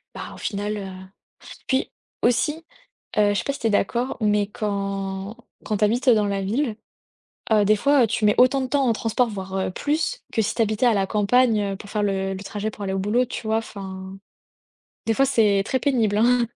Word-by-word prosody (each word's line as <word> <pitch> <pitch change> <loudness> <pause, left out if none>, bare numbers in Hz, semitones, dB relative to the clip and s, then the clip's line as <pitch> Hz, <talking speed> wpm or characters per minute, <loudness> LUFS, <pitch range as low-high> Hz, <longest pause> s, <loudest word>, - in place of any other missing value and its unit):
bah, - - -7
au - - -12
final, 205 0 -3
heu, 195 -2 -6 0.8
puis 265 0 0 0.3
aussi, 300 +7 +1 0.5
heu, 205 -1 +4
je 200 - 0
sais - - -3
pas 280 - 0
si - - -8
tu 225 - 0
es - - +1
d'accord? 240 +5 0
Mais 210 -1 +2
quand 195 0 -3 0.3
quand 210 - -1
tu 210 - +3
habites 245 +5 +1
dans 215 -3 +4
la 200 -1 -1
ville, 225 +4 -1 0.8
heu, 210 -2 +5
des 215 - +5
fois, 280 +1 +4
heu, - - +3
tu 215 - -2
mets 210 - +4
autant 255 +2 +5
de 260 - -2
temps 280 -1 +1
en 230 - +3
transport, 225 +2 0
voir, 190 -2 -6
heu, 190 - -1
plus, 310 - -2
que 225 - +2
si 200 - -1
tu 230 - +1
habitais 220 +3 +1
à 230 - +4
la 195 -1 +1
campagne, 220 +2 +3
heu, - - -4
pour 205 -1 -11
faire 210 -1 -1
le 195 -1 -1
le 190 +1 -7
trajet 210 +1 -4
pour 205 - -8
aller 190 -1 -2
au 195 - -1
boulot, 220 +6 +1
tu 245 -2 -7
vois? 220 0 +2
Enfin, 190 -3 -7 0.9
des 225 - +2
fois, 270 - +3
c'est 210 -6 +3
très 260 - 0
pénible, 225 -7 +1
hein. 245 +1 +4
215 Hz, 225 wpm, -23 LUFS, 200-245 Hz, 0.9 s, heu